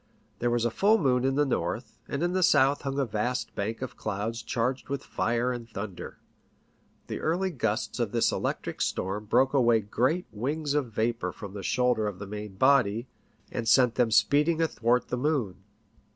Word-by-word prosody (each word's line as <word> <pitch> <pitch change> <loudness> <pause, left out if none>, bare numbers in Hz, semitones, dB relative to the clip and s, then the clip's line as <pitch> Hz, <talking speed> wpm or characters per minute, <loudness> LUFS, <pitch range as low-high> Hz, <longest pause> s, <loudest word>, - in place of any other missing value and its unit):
There 120 - +1
was 120 -1 +1
a 120 - +1
full 210 - +4
moon 130 - +2
in 135 0 +1
the 145 +1 +3
north, 135 - -3
and 140 +4 -2
in 175 +1 0
the 185 - +1
south 140 -4 +4
hung 135 0 -3
a 140 - +2
vast 120 +3 -2
bank 110 +5 -3
of 130 - -7
clouds 110 +3 -3
charged 125 +2 -2
with 140 0 -3
fire 120 +2 0
and 120 -1 -7
thunder. 100 -4 -7 0.9
The - - -5
early 180 +4 0
gusts 115 -4 -2
of 115 -4 0
this 115 0 +2
electric - - -3
storm 100 +3 -2
broke 130 +6 +3
away 120 -4 +4
great 130 - 0
wings 145 +7 -2
of 140 -6 0
vapour 110 -3 -1
from 100 +1 -9
the 100 - -6
shoulder 125 +1 +1
of 100 -3 -4
the 100 - -7
main 105 0 -7
body, 125 -2 +3 0.4
and 115 - -3
sent 125 0 +5
them 120 -2 +2
speeding 145 +10 +3
athwart 125 -6 +1
the 125 - -1
moon. 130 -8 0
120 Hz, 185 wpm, -28 LUFS, 110-140 Hz, 0.9 s, sent